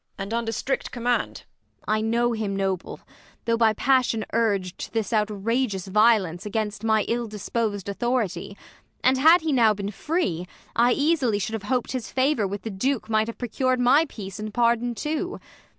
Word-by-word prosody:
And 195 +3 -5
under 230 -1 -1
strict 260 +4 -2
command. 245 0 -1 0.4
Ang. 215 - +2
I 215 - 0
know 235 +2 +1
him 215 -3 -2
noble, 190 -2 -2 0.4
though 230 0 +2
by 225 -1 +3
passion 250 -3 +2
urg'd 200 -6 0
To - - -6
this 225 -1 -2
outrageous 210 0 0
violence 200 -4 +3
against 210 0 -3
My 220 -1 +3
ill 235 0 -1
dispos'd 210 -1 -3
authority: 200 -3 -2 0.5
and, 260 +1 +4
had 325 +5 +7
He 320 -1 -1
now 225 -4 +4
been 200 0 -4
free, 195 - -2 0.3
I 240 +1 +4
easily 285 -8 +2
should 205 +2 -3
have 220 - -3
hop'd 255 -2 0
His 255 -4 -4
favour 260 -5 +1
with 200 +1 -6
the 225 - -4
Duke 225 +3 -1
might 215 0 +2
have 230 - -6
procur'd 255 +1 0
My 275 +6 +4
peace 195 -3 -8
and 215 0 -5
pardon 235 +1 +1
too. 315 - -3
225 Hz, 175 wpm, -25 LUFS, 205-245 Hz, 0.5 s, had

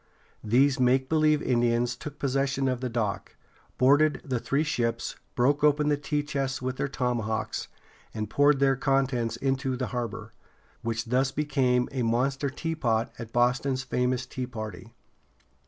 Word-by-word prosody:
These 130 +5 +3
make 130 +1 +3
believe 155 -1 +3
Indians 120 0 +1
took 145 +4 -8
possession 135 0 0
of 125 -1 -1
the 130 - -2
dock, 110 -4 -3 0.4
boarded 145 +4 +4
the 130 -4 -1
three 140 +5 0
ships, 115 -6 -1 0.2
broke 140 +4 +2
open 150 0 +4
the 145 - +3
tea 145 +1 -2
chests 135 -2 -2
with 130 0 -3
their - - -1
tomahawks, 120 -5 -2 0.4
and 110 -1 -4
poured 145 -1 +3
their 135 -1 +4
contents 135 -4 0
into 135 +1 -1
the 130 - -1
harbor, 110 -3 -4 0.5
which 115 0 -2
thus 130 +3 +1
became 130 -4 +1
a 130 -2 -2
monster 130 +4 0
teapot 135 -7 -1
at 115 -1 -7
Boston's 130 +2 +1
famous 125 0 0
Tea 125 0 -5
Party. 110 -3 -7
130 Hz, 150 wpm, -27 LUFS, 120-140 Hz, 0.5 s, boarded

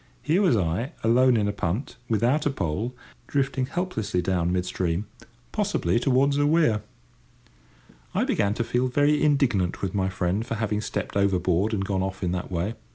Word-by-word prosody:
Here 165 +6 +2
was 175 - +4
I, 95 - -1
alone 120 +2 +4
in 105 -1 +1
a - - +1
punt, 100 - -3
without 120 +7 +2
a - - +3
pole, 105 - -2 0.3
drifting 135 -2 0
helplessly 145 - -2
down 90 -1 0
mid 90 0 0
stream—possibly 115 - -2
towards 135 +2 +2
a 145 - +3
weir. 150 -9 +3 1.3
I - - +2
began 100 0 +1
to 120 - 0
feel 125 +2 0
very 145 +3 +2
indignant 125 - +1
with 95 - -1
my 95 -2 0
friend 95 +2 -1
for 115 - -4
having 105 -1 -1
stepped 105 -2 -4
overboard 95 0 +2
and 100 -3 -1
gone 95 -1 -1
off 95 0 -4
in 90 - 0
that 90 +1 -4
way. 90 +5 -1
110 Hz, 170 wpm, -25 LUFS, 95-130 Hz, 1.3 s, was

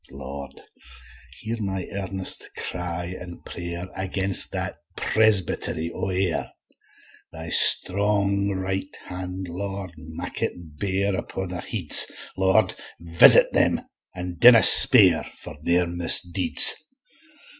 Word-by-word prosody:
Lord, 70 +1 -10 0.8
hear 115 +1 -6
my 95 -2 -4
earnest 95 -1 -3
cry 90 -1 -5
and 90 -1 -12
pray'r, 85 +1 -7
Against 95 0 -2
that - - -3 0.2
Presbyt'ry 95 -6 0
o' 95 - -5
Ayr; 90 -2 -2 0.8
Thy 80 0 -9
strong 100 +2 +4
right 95 0 -5
hand, 90 +1 -7
Lord, 95 +1 -6
make 80 0 -9
it 80 -4 -6
bare 100 0 -2
Upo' 95 +1 -6
their 90 -1 -7
heads; 95 -10 +1 0.2
Lord 95 +1 +1 0.3
visit 85 0 +4
them, - - +1 0.4
an' 90 -1 -7
dinna 120 -2 +7
spare, 95 -10 +7
For 75 - -11
their 90 +1 +1
misdeeds. 85 0 +2
95 Hz, 110 wpm, -22 LUFS, 85-100 Hz, 0.8 s, dinna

